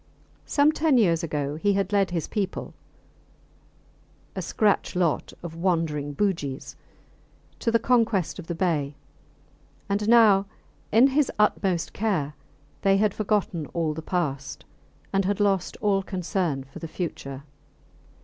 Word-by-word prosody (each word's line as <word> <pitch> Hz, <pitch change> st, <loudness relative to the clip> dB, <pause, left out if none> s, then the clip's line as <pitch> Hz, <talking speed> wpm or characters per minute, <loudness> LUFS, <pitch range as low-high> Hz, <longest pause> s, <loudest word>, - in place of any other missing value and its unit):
Some 290 Hz, +1 st, +4 dB
ten 310 Hz, -3 st, +2 dB
years 170 Hz, -8 st, +3 dB
ago 150 Hz, -2 st, -2 dB
he 200 Hz, +5 st, +2 dB
had 195 Hz, +1 st, -1 dB
led 195 Hz, -2 st, +3 dB
his 170 Hz, -4 st, -2 dB
people 195 Hz, -3 st, -3 dB, 1.6 s
a -, -, -2 dB
scratch 210 Hz, -3 st, +1 dB
lot 175 Hz, -4 st, 0 dB
of 170 Hz, -2 st, -6 dB
wandering 165 Hz, -5 st, -1 dB
Bugis 150 Hz, -8 st, -2 dB, 0.8 s
to -, -, 0 dB
the 230 Hz, -, +4 dB
conquest 225 Hz, -7 st, +1 dB
of 170 Hz, -, -9 dB
the 170 Hz, -, -3 dB
bay, 155 Hz, -6 st, 0 dB, 0.9 s
and 205 Hz, +2 st, 0 dB
now 210 Hz, -4 st, +6 dB, 0.4 s
in 230 Hz, +4 st, +6 dB
his 285 Hz, +1 st, +2 dB
august 190 Hz, -4 st, +1 dB
care 185 Hz, -9 st, -1 dB, 0.5 s
they 195 Hz, 0 st, +4 dB
had 210 Hz, 0 st, +2 dB
forgotten 200 Hz, -7 st, -1 dB
all 165 Hz, -2 st, 0 dB
the 160 Hz, -, -6 dB
past, 145 Hz, -7 st, -3 dB, 0.5 s
and 195 Hz, 0 st, +3 dB
had 205 Hz, +1 st, 0 dB
lost 195 Hz, -3 st, +1 dB
all 200 Hz, -2 st, +2 dB
concern 180 Hz, -6 st, -2 dB
for 135 Hz, 0 st, -12 dB
the 165 Hz, -, -6 dB
future. 140 Hz, -5 st, -5 dB
185 Hz, 135 wpm, -25 LUFS, 160-205 Hz, 1.6 s, now